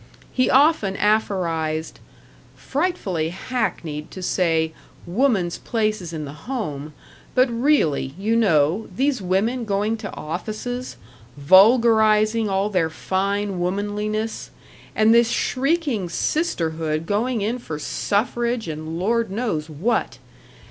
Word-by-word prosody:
He 255 Hz, -, +2 dB
often 270 Hz, -8 st, +4 dB
aphorized, 170 Hz, -7 st, 0 dB, 0.6 s
"Frightfully 265 Hz, -, -2 dB
hackneyed 170 Hz, -7 st, -3 dB
to 185 Hz, -, -8 dB
say, 165 Hz, -3 st, +1 dB, 0.3 s
'woman's 190 Hz, -3 st, +1 dB
place 215 Hz, -3 st, -1 dB
is 170 Hz, -2 st, -7 dB
in 155 Hz, -2 st, -5 dB
the 145 Hz, -, -11 dB
home,' 155 Hz, -, -4 dB, 0.4 s
but 255 Hz, +1 st, +5 dB
really, 230 Hz, -, +1 dB
you 215 Hz, +4 st, 0 dB
know, 180 Hz, -2 st, +2 dB
these 270 Hz, 0 st, +1 dB
women 205 Hz, +7 st, 0 dB
going 210 Hz, +1 st, 0 dB
to 215 Hz, -3 st, -6 dB
offices, 215 Hz, +10 st, -5 dB, 0.4 s
vulgarizing 215 Hz, -, +5 dB
all 195 Hz, +2 st, 0 dB
their 175 Hz, -5 st, +1 dB
fine 195 Hz, +3 st, -2 dB
womanliness, 210 Hz, +4 st, -2 dB, 0.5 s
and 220 Hz, +1 st, +5 dB
this 235 Hz, 0 st, +5 dB
shrieking 270 Hz, -, 0 dB
sisterhood 165 Hz, -, -1 dB
going 220 Hz, +4 st, 0 dB
in 225 Hz, +5 st, -1 dB
for 160 Hz, -10 st, -6 dB
suffrage 235 Hz, +7 st, -1 dB
and 155 Hz, +1 st, -5 dB
Lord 230 Hz, +5 st, 0 dB
knows 195 Hz, -8 st, -2 dB
what. 200 Hz, +10 st, -1 dB
205 Hz, 115 wpm, -22 LUFS, 165-235 Hz, 0.6 s, but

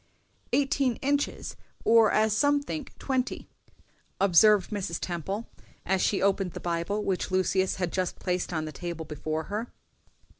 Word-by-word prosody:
"Eighteen 275 Hz, -3 st, +2 dB
inches, 285 Hz, +1 st, -1 dB, 0.3 s
or, 225 Hz, -1 st, +5 dB
as 215 Hz, 0 st, +3 dB
some 285 Hz, +4 st, +3 dB
think 295 Hz, -1 st, -6 dB
twenty," 260 Hz, -2 st, -2 dB, 0.7 s
observed 200 Hz, +1 st, +5 dB
Mrs. 195 Hz, -5 st, -3 dB
Temple, 190 Hz, +6 st, -4 dB, 0.4 s
as 190 Hz, 0 st, +1 dB
she 200 Hz, -, +1 dB
opened 195 Hz, -3 st, +1 dB
the -, -, -6 dB
Bible 175 Hz, +5 st, -2 dB
which 190 Hz, -3 st, -1 dB
Lucius 185 Hz, 0 st, +1 dB
had 180 Hz, -3 st, -2 dB
just 185 Hz, -1 st, -1 dB
placed 180 Hz, -1 st, -2 dB
on 160 Hz, -2 st, -2 dB
the 155 Hz, -, -5 dB
table 170 Hz, -1 st, -5 dB
before 155 Hz, +1 st, -3 dB
her. 210 Hz, +7 st, -4 dB
195 Hz, 145 wpm, -28 LUFS, 175-225 Hz, 0.7 s, or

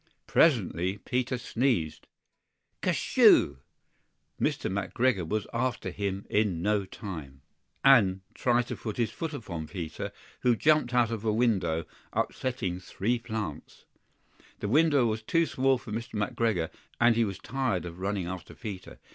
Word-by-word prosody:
Presently 95 Hz, -, +2 dB
Peter 125 Hz, +3 st, -1 dB
sneezed 115 Hz, -, -1 dB, 0.7 s
"Kertyschoo!" -, -, +4 dB, 0.8 s
Mr. -, -, 0 dB
McGregor 100 Hz, 0 st, 0 dB
was 105 Hz, +3 st, -1 dB
after 120 Hz, +1 st, -1 dB
him 100 Hz, -1 st, -3 dB
in 100 Hz, -6 st, +1 dB
no 105 Hz, -1 st, +1 dB
time, 75 Hz, -9 st, -8 dB, 0.4 s
AND 100 Hz, -9 st, +6 dB
tried 120 Hz, -1 st, +2 dB
to -, -, -2 dB
put 110 Hz, -3 st, -5 dB
his 115 Hz, -3 st, 0 dB
foot 165 Hz, +4 st, -4 dB
upon 85 Hz, -, -6 dB
Peter, 85 Hz, -4 st, -5 dB, 0.3 s
who 125 Hz, -1 st, +3 dB
jumped 150 Hz, -1 st, +3 dB
out 120 Hz, -2 st, +3 dB
of 115 Hz, -2 st, -3 dB
a 110 Hz, -, +2 dB
window, 105 Hz, -8 st, +1 dB, 0.3 s
upsetting 115 Hz, -9 st, -2 dB
three 115 Hz, +6 st, -1 dB
plants. 110 Hz, -10 st, -6 dB, 0.7 s
The -, -, -3 dB
window 145 Hz, +1 st, +4 dB
was 110 Hz, -1 st, -1 dB
too 165 Hz, +9 st, +2 dB
small 135 Hz, -2 st, +2 dB
for 120 Hz, -, -10 dB
Mr. 115 Hz, +2 st, -4 dB
McGregor, 105 Hz, -6 st, 0 dB, 0.3 s
and 120 Hz, -1 st, +5 dB
he 115 Hz, -, +3 dB
was 100 Hz, -4 st, -3 dB
tired 125 Hz, -11 st, -1 dB
of 85 Hz, +1 st, -8 dB
running 100 Hz, -1 st, -1 dB
after 90 Hz, 0 st, -7 dB
Peter. 100 Hz, -4 st, -7 dB
110 Hz, 140 wpm, -29 LUFS, 95-125 Hz, 0.8 s, AND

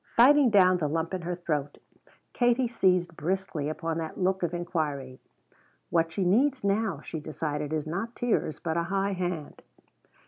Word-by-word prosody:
Fighting 270 Hz, +2 st, +7 dB
down 185 Hz, -4 st, +5 dB
the 155 Hz, -, 0 dB
lump 165 Hz, +4 st, -2 dB
in 185 Hz, -, -2 dB
her 175 Hz, +1 st, -3 dB
throat 150 Hz, -5 st, -3 dB, 0.6 s
Katie 245 Hz, +1 st, +2 dB
seized 180 Hz, -7 st, +1 dB
briskly 170 Hz, -3 st, -2 dB
upon 165 Hz, +1 st, -3 dB
that 160 Hz, -1 st, -5 dB
look 190 Hz, +1 st, +1 dB
of 175 Hz, -2 st, 0 dB
inquiry. 155 Hz, -7 st, -3 dB, 0.7 s
"What 165 Hz, -1 st, +2 dB
she 185 Hz, +3 st, -1 dB
needs 255 Hz, +8 st, +2 dB
now," 200 Hz, -5 st, 0 dB
she 160 Hz, -, -6 dB
decided, 150 Hz, -1 st, -4 dB
"is 155 Hz, -2 st, -1 dB
not 195 Hz, +9 st, -4 dB
tears, 235 Hz, -10 st, 0 dB
but 160 Hz, -1 st, -2 dB
a 170 Hz, -, +1 dB
high 195 Hz, +1 st, 0 dB
hand." 180 Hz, -4 st, -4 dB
175 Hz, 165 wpm, -28 LUFS, 155-195 Hz, 0.7 s, Fighting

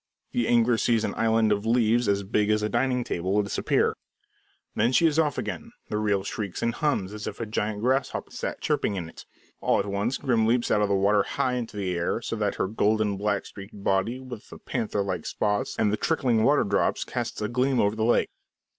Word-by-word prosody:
The 120 Hz, -2 st, 0 dB
angler 120 Hz, 0 st, +3 dB
sees 115 Hz, -2 st, +2 dB
an -, -, -1 dB
island 110 Hz, -1 st, +2 dB
of 100 Hz, 0 st, +1 dB
leaves 115 Hz, 0 st, +2 dB
as 100 Hz, 0 st, +1 dB
big 105 Hz, +1 st, 0 dB
as 105 Hz, 0 st, +2 dB
a 105 Hz, -, 0 dB
dining 125 Hz, +1 st, +1 dB
table 95 Hz, 0 st, -1 dB
disappear. 100 Hz, -, +1 dB, 0.8 s
Then 120 Hz, -, +2 dB
she 165 Hz, -, +4 dB
is 160 Hz, -1 st, +3 dB
off 150 Hz, -4 st, +1 dB
again. -, -, -5 dB, 0.2 s
The 105 Hz, -, -1 dB
reel 105 Hz, -2 st, +1 dB
shrieks 100 Hz, -2 st, -4 dB
and 115 Hz, -, +1 dB
hums 110 Hz, -11 st, -1 dB
as 105 Hz, 0 st, -6 dB
if -, -, -6 dB
a 115 Hz, -, -2 dB
giant 105 Hz, -1 st, -2 dB
grasshopper 130 Hz, +3 st, 0 dB
sat -, -, -5 dB
chirping 100 Hz, -, 0 dB
in 85 Hz, -4 st, -4 dB
it. 80 Hz, -, -13 dB, 0.3 s
All -, -, +2 dB
at -, -, 0 dB
once, 100 Hz, +5 st, -1 dB
Grim 115 Hz, -4 st, +1 dB
leaps 120 Hz, +1 st, +1 dB
out 105 Hz, -, +3 dB
of 105 Hz, -, +1 dB
the 100 Hz, -, +2 dB
water 100 Hz, +1 st, +3 dB
high 125 Hz, +5 st, -1 dB
into 120 Hz, -4 st, -4 dB
the 95 Hz, -3 st, -1 dB
air, 85 Hz, 0 st, -1 dB
so -, -, -4 dB
that -, -, -1 dB
her -, -, -1 dB
golden, 105 Hz, 0 st, +1 dB
black 100 Hz, 0 st, -1 dB
streaked 100 Hz, 0 st, -11 dB
body, 100 Hz, +7 st, +1 dB
with 125 Hz, -4 st, -10 dB
the -, -, -10 dB
panther 105 Hz, -2 st, -2 dB
like 90 Hz, -4 st, -3 dB
spots 105 Hz, -1 st, -1 dB
and 105 Hz, -2 st, +2 dB
the -, -, +1 dB
trickling 125 Hz, -8 st, +1 dB
water 145 Hz, +4 st, +4 dB
drops, 100 Hz, 0 st, +1 dB
casts -, -, -4 dB
a 105 Hz, -, -1 dB
gleam 125 Hz, +3 st, +1 dB
over 105 Hz, +1 st, +2 dB
the 110 Hz, -, -1 dB
lake. 120 Hz, +2 st, +3 dB
110 Hz, 220 wpm, -26 LUFS, 100-120 Hz, 0.8 s, she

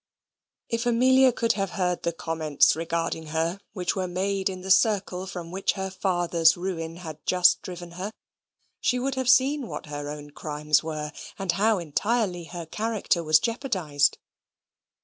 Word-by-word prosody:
If 230 Hz, +1 st, -1 dB
Amelia 260 Hz, +2 st, +5 dB
could 230 Hz, -1 st, +1 dB
have 195 Hz, -3 st, -2 dB
heard 180 Hz, -2 st, 0 dB
the 170 Hz, -, 0 dB
comments 160 Hz, -3 st, +2 dB
regarding 165 Hz, -1 st, -2 dB
her 165 Hz, +4 st, -1 dB
which 180 Hz, -3 st, -1 dB
were 185 Hz, -2 st, -1 dB
made 190 Hz, +2 st, -1 dB
in 185 Hz, -1 st, -6 dB
the 190 Hz, +1 st, -2 dB
circle 190 Hz, -2 st, +2 dB
from 175 Hz, -3 st, -7 dB
which 190 Hz, +2 st, 0 dB
her 190 Hz, -1 st, -4 dB
father's 175 Hz, -3 st, +2 dB
ruin 165 Hz, -3 st, -4 dB
had 160 Hz, -4 st, -9 dB
just 180 Hz, 0 st, +4 dB
driven 175 Hz, -1 st, -8 dB
her, 185 Hz, +4 st, -5 dB, 0.7 s
she 250 Hz, -, +1 dB
would 265 Hz, +2 st, -1 dB
have 260 Hz, -1 st, -1 dB
seen 265 Hz, +1 st, +4 dB
what -, -, -6 dB
her 145 Hz, -1 st, -5 dB
own 145 Hz, 0 st, -8 dB
crimes 150 Hz, 0 st, 0 dB
were, 155 Hz, -1 st, -4 dB, 0.3 s
and 195 Hz, -2 st, 0 dB
how 210 Hz, +4 st, +2 dB
entirely 180 Hz, +2 st, -1 dB
her 170 Hz, 0 st, -7 dB
character 210 Hz, -1 st, -1 dB
was 155 Hz, 0 st, +6 dB
jeopardised. 185 Hz, -, 0 dB
180 Hz, 160 wpm, -26 LUFS, 165-210 Hz, 0.7 s, was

